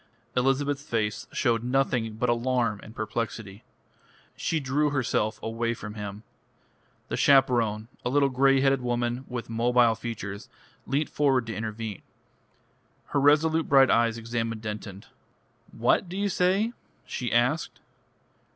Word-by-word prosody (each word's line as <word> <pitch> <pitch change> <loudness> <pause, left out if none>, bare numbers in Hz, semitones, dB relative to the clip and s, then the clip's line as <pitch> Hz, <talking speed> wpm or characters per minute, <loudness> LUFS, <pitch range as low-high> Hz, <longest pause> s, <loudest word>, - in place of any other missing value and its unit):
Elizabeth's 135 +2 +1
face 110 -7 -2
showed 115 -3 +1
nothing 125 -3 0
but 125 +3 -1
alarm 120 -2 +1
and 110 - -13
perplexity. 110 -1 -4 0.7
She 165 - -1
drew 145 +2 +1
herself 120 -6 0
away 115 +1 -1
from 105 -2 -8
him. 105 0 -7 0.9
The - - -1
chaperone, 115 -6 +3 0.2
a - - -1
little 140 +1 +3
grey 135 +1 +3
headed 135 -1 +3
woman 120 +1 -1
with 125 -2 -5
mobile 120 +1 +3
features, 105 -3 -6 0.4
leant 145 +3 0
forward 135 -5 +1
to 115 - -5
intervene. 110 -2 -5 1.1
Her 140 - +1
resolute 155 +3 +3
bright 135 -2 +6
eyes 115 0 +3
examined 115 -1 -3
Denton. 105 -1 -6 0.7
"What 180 - +1
do 185 - -5
you 200 0 0
say?" 195 +6 +1 0.3
she 120 -1 -4
asked. 125 +7 +1
120 Hz, 130 wpm, -27 LUFS, 115-135 Hz, 1.1 s, bright